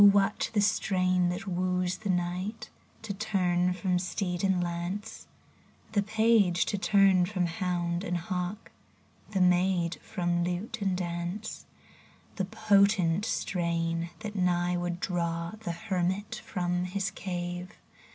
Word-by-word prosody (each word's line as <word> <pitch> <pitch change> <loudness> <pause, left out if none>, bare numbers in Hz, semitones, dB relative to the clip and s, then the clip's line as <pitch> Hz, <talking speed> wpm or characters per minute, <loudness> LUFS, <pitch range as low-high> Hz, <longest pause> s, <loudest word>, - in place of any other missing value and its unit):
what 200 -1 +5
the 210 - +3
strain 185 -3 +2
that 180 +3 -3
woos 180 -1 0
the 210 - -5
knight 180 +4 -2 0.3
To 215 -2 -3
turn 180 -4 +1
from 180 0 0
steed 180 0 -2
and 190 -2 +3
lance, 175 +4 -4 0.6
The 210 -2 +2
page 215 -4 +3
to - - +1
turn 195 -3 +4
from 185 -2 0
hound 175 0 -1
and 175 -1 -1
hawk, 180 +4 -4 0.6
The 195 -3 0
maid 180 -1 +3
from 175 -4 -1
lute 185 +6 -3
and 190 -2 +1
dance; 175 +4 -4 0.7
The 190 - 0
potent 200 -3 +3
strain, 170 -4 -1
that 215 -1 -5
nigh 180 -1 +2
would 175 0 -2
draw 170 -2 -1
The 210 -6 -3
hermit 190 +3 -2
from 180 0 -1
his 195 +2 -2
cave. 175 -2 -4
180 Hz, 130 wpm, -29 LUFS, 175-200 Hz, 0.7 s, what